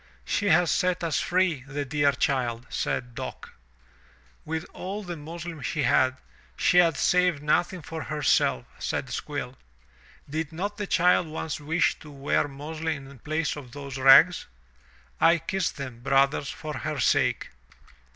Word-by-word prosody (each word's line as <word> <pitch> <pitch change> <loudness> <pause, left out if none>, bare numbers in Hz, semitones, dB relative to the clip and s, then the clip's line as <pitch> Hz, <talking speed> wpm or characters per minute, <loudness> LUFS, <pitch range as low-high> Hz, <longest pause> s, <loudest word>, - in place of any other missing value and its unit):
'*She 205 - 0
has 175 -2 +4
set 180 -1 +1
us 165 -2 0
free, 180 -6 +1
the 145 +1 -3
dear 145 +1 +2
child," 125 -3 -1
said 125 -1 -2
Dock. 130 +1 -7 0.9
"With 160 +2 -3
all 200 +3 -5
the 175 -2 -5
muslin 165 +1 -7
she 150 +3 -2
had, 130 +1 +3 0.4
she 180 - +4
has 165 -5 +4
saved 180 -5 +2
nothing 175 +3 +1
for 160 +2 -6
herself," 150 - +1
said - - -3
Squill. - - -5 0.7
Did 155 +2 -3
not 200 +5 -4
the 205 -1 -3
child 180 -1 +3
once 160 +1 -4
wish 160 +4 +1
to 155 - -12
wear 140 0 0
muslin 150 +1 -5
in 135 -1 -13
place 155 +4 -2
of 130 -5 -10
those 140 -2 -7
rags? 135 +7 +7 0.7
I 165 +1 +5
kiss 190 +2 -1
them, 130 -5 -8
brothers, 135 +2 +2
for 155 -2 -6
her 150 -1 -3
sake." - - +1
155 Hz, 150 wpm, -26 LUFS, 140-170 Hz, 0.9 s, rags